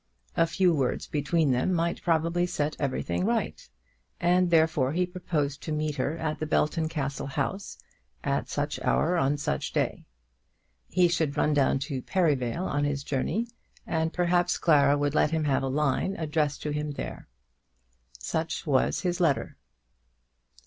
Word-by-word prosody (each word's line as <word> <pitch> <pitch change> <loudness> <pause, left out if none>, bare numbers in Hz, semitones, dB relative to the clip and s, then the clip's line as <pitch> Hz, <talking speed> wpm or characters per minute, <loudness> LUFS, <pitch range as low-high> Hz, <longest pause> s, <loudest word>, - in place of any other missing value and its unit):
A 165 - +3
few 175 +2 +2
words 135 -5 0
between 150 0 +1
them 125 +8 +1
might 170 0 -1
probably 170 +1 +1
set 150 -3 -1
everything 90 -11 -1
right, - - -1 0.5
and 180 +1 +3
therefore 160 -5 +3
he 180 +2 +2
proposed 155 -6 -2
to 155 - -5
meet 150 -1 -1
her 145 +5 -1
at 155 -1 -3
the 155 - -2
Belton 155 +1 +1
Castle 140 -4 -3
house, 150 +8 -3 0.5
at 140 0 -1
such 145 0 -2
an - - -5
hour, 170 +4 +2
on 145 -3 +2
such 70 - -2
a - - -19
day. - - -1 0.8
He 180 0 +4
should 160 -4 0
run 150 - +2
down 140 -2 +3
to 135 -5 -4
Perivale 155 -2 0
on 145 -4 0
his 145 -1 -1
journey, 155 - -1 0.4
and 160 -1 0
perhaps 175 0 +1
Clara 145 -3 +4
would 145 0 0
let 155 - +3
him 160 0 0
have 140 -3 +1
a 135 - -1
line 150 +7 0
addressed 150 -2 -1
to 150 - -2
him 150 0 -2
there. - - -6 0.9
Such 160 - -3
was 135 -4 +2
his 180 -1 -1
letter. 160 -6 +1
150 Hz, 165 wpm, -27 LUFS, 140-170 Hz, 0.9 s, He